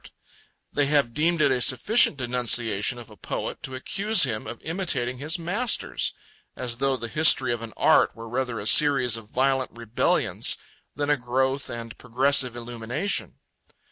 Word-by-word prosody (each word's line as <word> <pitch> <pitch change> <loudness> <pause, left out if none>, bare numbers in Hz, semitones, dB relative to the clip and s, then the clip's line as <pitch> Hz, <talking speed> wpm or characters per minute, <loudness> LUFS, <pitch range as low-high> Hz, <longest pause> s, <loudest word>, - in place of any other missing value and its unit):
They 145 -1 +1
have 140 -5 +1
deemed 165 +3 +1
it 140 - +3
a 125 -1 0
sufficient 140 - +4
denunciation 120 -3 0
of 120 -2 -12
a - - -13
poet - - -6
to 130 - -5
accuse 200 +9 +2
him 110 -6 -1
of 120 - -7
imitating 145 -8 -2
his 155 +5 -1
masters; 200 +8 -1 0.4
as 120 -2 -5
though 135 0 0
the 120 - -6
history 150 -2 +4
of 115 - -5
an 115 -1 -8
art - - +3
were 115 0 -10
rather 125 0 -3
a 100 - -7
series 130 -2 +5
of 110 -2 -9
violent 130 +1 0
rebellions 115 -1 0 0.4
than 145 +2 -1
a 145 - +2
growth 130 +2 -2
and 115 -1 -7
a - - -13
progressive 125 0 +1
illumination. 120 - -3
130 Hz, 165 wpm, -24 LUFS, 120-145 Hz, 0.4 s, series